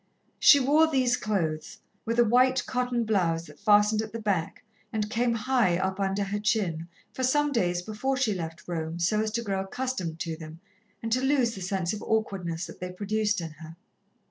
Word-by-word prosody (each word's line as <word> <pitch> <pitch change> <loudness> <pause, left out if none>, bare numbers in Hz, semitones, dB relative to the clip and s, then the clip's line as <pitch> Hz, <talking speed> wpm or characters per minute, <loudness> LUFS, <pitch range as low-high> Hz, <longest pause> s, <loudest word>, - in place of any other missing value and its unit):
She 285 - +8
wore 295 +4 +4
these 260 -5 +2
clothes, 165 -10 -2 0.3
with 230 +1 -1
a 240 - +6
white 255 +3 +3
cotton 250 -1 -1
blouse 175 -7 0
that - - -15
fastened 210 0 +4
at 220 -1 -6
the 230 - -4
back 195 -7 -2 0.3
and 215 -1 -2
came 235 +1 +1
high 230 -6 +2
up 190 +1 -2
under 195 +1 0
her 200 +1 -2
chin, 190 -7 0 0.3
for - - -5
some 295 +3 +2
days 180 -8 0
before 220 +7 -2
she 250 -6 +1
left 165 -3 -6
Rome, 165 -1 -3
so 200 +5 +1
as 220 - -1
to 235 0 -1
grow 195 -3 -1
accustomed 195 -6 -3
to 165 -1 -3
them, 160 0 -10 0.4
and 225 - -3
to 255 +3 +2
lose 265 -4 +2
the 195 - -8
sense 185 -1 -1
of 210 - -5
awkwardness 190 -6 -2
that - - -11
they 180 0 -5
produced 210 +1 -1
in 165 -1 -6
her. 160 +1 -12
210 Hz, 195 wpm, -27 LUFS, 175-240 Hz, 0.4 s, She